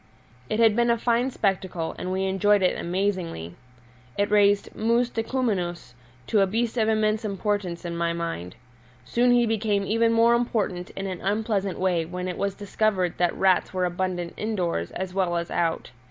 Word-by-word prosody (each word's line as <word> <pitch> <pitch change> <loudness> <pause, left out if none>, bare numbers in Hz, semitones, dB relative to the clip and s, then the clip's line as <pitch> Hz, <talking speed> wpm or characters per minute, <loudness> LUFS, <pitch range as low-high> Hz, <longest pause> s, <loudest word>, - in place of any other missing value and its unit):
It 215 - -1
had 225 -2 +5
been 240 +1 +2
a 235 - +3
fine 240 +2 +1
spectacle, 185 -7 -1
and 185 - -3
we 190 +1 -1
enjoyed 195 +1 +3
it 180 - +3
amazingly; 175 - -2 0.6
it 205 0 +1
raised 205 -1 +4
Mus 235 +2 +1
decumanus 205 - -2 0.3
to 210 - +2
a 195 - +4
beast 225 +4 -1
of 220 -2 +2
immense 215 0 +1
importance 200 -4 -2
in 170 -1 -4
my 170 0 0
mind. 165 - -4 0.5
Soon 245 +1 +2
he 245 -1 +5
became 215 -3 0
even 230 +2 +2
more 230 +1 +5
important 215 -7 -1
in 195 - -4
an 185 -2 -5
unpleasant 200 -2 -1
way 180 -3 +1
when 180 +2 -5
it 180 - -4
was 200 -1 -1
discovered 200 -4 -1
that 175 -1 +2
rats 190 -1 +2
were 185 -1 +1
abundant 175 -1 -2
indoors 180 - -2
as 185 0 -5
well 185 -3 0
as 170 0 -4
out. 165 -8 -1
195 Hz, 175 wpm, -25 LUFS, 180-220 Hz, 0.6 s, had